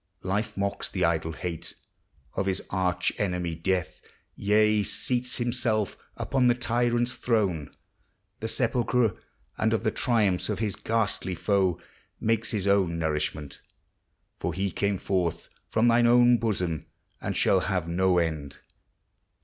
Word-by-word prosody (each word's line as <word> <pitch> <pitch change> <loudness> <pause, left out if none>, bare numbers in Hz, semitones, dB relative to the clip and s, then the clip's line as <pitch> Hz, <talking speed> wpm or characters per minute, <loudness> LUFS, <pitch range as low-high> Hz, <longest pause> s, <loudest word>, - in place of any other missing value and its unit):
Life 105 +3 -2
mocks 100 0 -2
the - - 0
idle 80 -1 0
hate 85 0 -5 0.6
Of 95 - -1
his 95 - 0
arch 90 -1 0
enemy 90 -4 -1
Death, 90 +2 -2 0.2
— - - -46
yea, 105 +1 +3
seats 125 +5 -1
himself 120 -4 0 0.2
Upon 130 -2 +1
the 120 - +4
tyrant's 120 0 0
throne, 100 - 0 0.7
the 110 - -3
sepulchre, 120 -2 +1 0.5
And - - +2
of - - 0
the - - +2
triumphs 105 -7 +1
of 105 - -1
his 105 -3 -1
ghastly 105 -4 -1
foe 95 -1 +1 0.4
Makes 115 0 +1
his 100 -4 -1
own 95 -4 +3
nourishment. 75 -2 -2 0.8
For 85 - -2
he 95 +1 -1
came 100 +3 0
forth 85 -3 -1 0.2
From 110 +2 +2
thine 120 0 +5
own 120 0 +6
bosom, 90 -8 -1 0.3
and - - -2
shall 95 - +4
have 90 -3 -1
no 90 +2 +2
end. 75 -5 -1
100 Hz, 140 wpm, -27 LUFS, 90-115 Hz, 0.8 s, own